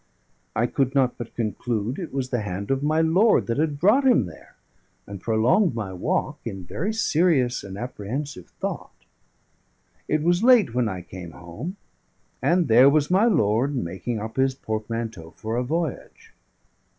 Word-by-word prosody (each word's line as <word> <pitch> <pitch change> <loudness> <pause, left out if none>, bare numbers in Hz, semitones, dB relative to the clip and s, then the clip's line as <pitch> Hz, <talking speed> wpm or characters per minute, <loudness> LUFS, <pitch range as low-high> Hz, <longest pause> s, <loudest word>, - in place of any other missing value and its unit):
I 120 - +2
could 135 +2 0
not 130 -3 +2
but 120 -1 -7
conclude 115 - -2
it 175 - -6
was 130 -2 -3
the 120 -3 0
hand 100 +2 -4
of 135 0 +1
my 155 +2 +2
lord 185 +8 +4
that 115 +4 -2
had 150 -2 0
brought 210 - +4
him 250 - +4
there; 80 -3 -13 0.5
and 100 -2 -8
prolonged 120 - +2
my 105 -5 -4
walk 90 - -1
in 95 -1 -6
very 165 - -3
serious 160 - +2
and 95 -1 -8
apprehensive 125 - -5
thought. - - -6 1.0
It 155 0 0
was 175 +2 +2
late 235 - +5
when 125 -2 +1
I 95 -3 -5
came 90 -1 -9
home, 90 - -7 0.6
and 175 -2 +2
there 125 +4 +7
was 150 +2 +2
my 195 +5 +4
lord 135 - +2
making 105 +2 -3
up 110 +3 -7
his 130 0 +2
portmanteau 110 -7 -5
for 110 +1 -4
a 125 - 0
voyage. 160 +2 -4
125 Hz, 160 wpm, -24 LUFS, 110-155 Hz, 1.0 s, there